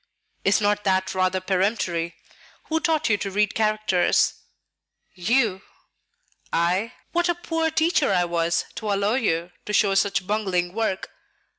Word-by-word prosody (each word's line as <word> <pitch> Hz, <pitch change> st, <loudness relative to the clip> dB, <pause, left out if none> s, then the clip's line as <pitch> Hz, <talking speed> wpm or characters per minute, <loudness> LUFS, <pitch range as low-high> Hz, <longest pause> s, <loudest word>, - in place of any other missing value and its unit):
"Is 195 Hz, -, +3 dB
not 205 Hz, 0 st, +1 dB
that 190 Hz, -1 st, +1 dB
rather 185 Hz, 0 st, +1 dB
peremptory? 185 Hz, -3 st, -1 dB, 0.5 s
Who 320 Hz, 0 st, +1 dB
taught 320 Hz, -2 st, +1 dB
you 210 Hz, -3 st, +3 dB
to 200 Hz, -, -4 dB
read 205 Hz, +1 st, +1 dB
characters?" 215 Hz, -4 st, +2 dB, 0.8 s
"You." 210 Hz, 0 st, +1 dB, 0.9 s
"I? 185 Hz, +8 st, 0 dB, 0.2 s
What 345 Hz, +1 st, +1 dB
a 345 Hz, -, +2 dB
poor 325 Hz, -1 st, -1 dB
teacher 320 Hz, -, +2 dB
I 180 Hz, -2 st, +2 dB
was 170 Hz, -1 st, 0 dB
to 215 Hz, -2 st, -2 dB
allow 200 Hz, +2 st, +1 dB
you 180 Hz, -8 st, 0 dB, 0.2 s
to 210 Hz, -, -3 dB
show 200 Hz, -1 st, +3 dB
such 195 Hz, -2 st, +1 dB
bungling 185 Hz, -4 st, -1 dB
work! 215 Hz, -3 st, -2 dB
200 Hz, 140 wpm, -24 LUFS, 185-225 Hz, 0.9 s, Is